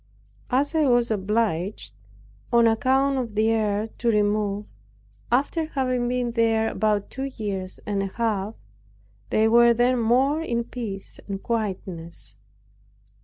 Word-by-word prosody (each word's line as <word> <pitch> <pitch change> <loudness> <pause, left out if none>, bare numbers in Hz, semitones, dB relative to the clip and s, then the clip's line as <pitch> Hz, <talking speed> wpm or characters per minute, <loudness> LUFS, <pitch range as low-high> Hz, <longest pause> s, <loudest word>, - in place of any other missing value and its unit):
As 275 +5 +1
I 315 -2 +3
was 240 -2 +3
obliged, 200 - -1 0.6
on 235 -1 +5
account 265 +4 +2
of 230 -4 -4
the 220 +1 +3
air, 215 -1 0
to 235 - +1
remove, 210 -1 +1 0.7
after 285 +6 +1
having 255 -4 -1
been 245 -1 -1
there 225 -1 +2
about 210 0 0
two 265 +1 -4
years 195 -4 -4
and 200 -1 -1
a 195 - -1
half, 215 0 -2 0.7
they 220 +1 +3
were 235 +1 +6
then 245 +1 +2
more 265 +7 +2
in 235 -7 -1
peace 220 -5 -7
and 195 -1 -5
quietness. 185 - -4
225 Hz, 130 wpm, -24 LUFS, 205-245 Hz, 0.7 s, were